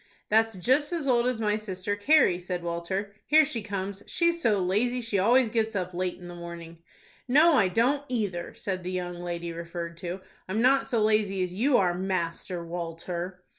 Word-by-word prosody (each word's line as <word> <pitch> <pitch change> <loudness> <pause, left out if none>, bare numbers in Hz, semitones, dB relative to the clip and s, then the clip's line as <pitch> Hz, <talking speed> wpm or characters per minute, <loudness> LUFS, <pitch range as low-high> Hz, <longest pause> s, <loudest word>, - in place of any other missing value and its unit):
"That's 225 0 +3
just 260 - +1
as 320 -5 -2
old 240 -1 +3
as 250 -3 -1
my 210 -1 +1
sister 205 -1 -3
Carrie," 205 - +4
said 180 -1 -4
Walter; 175 +4 -3
"here 310 +1 +6
she 260 -6 -3
comes. 200 -1 -4
She's 340 -1 +1
so 220 -8 +3
lazy 210 +7 +1
she 230 -4 -1
always 240 +5 +4
gets 220 -1 -1
up 180 -2 -2
late 180 0 -2
in 180 - -11
the 175 - -8
morning." 170 -1 -9 0.5
"No, 305 +6 +6
I 215 -9 +4
don't 250 +9 +1
either," 205 -8 -3
said 185 -2 -3
the 180 - -5
young 180 -1 -4
lady 170 -1 -4
referred 170 0 -6
to; 180 +2 -5 0.3
"I'm 210 +4 -1
not 265 +3 +4
so 235 -5 +1
lazy 210 -3 +2
as 180 -1 -4
you 245 +7 +3
are, 180 -3 +2
Master 175 -1 -3
Walter." 175 +2 -5
195 Hz, 190 wpm, -27 LUFS, 175-230 Hz, 0.5 s, here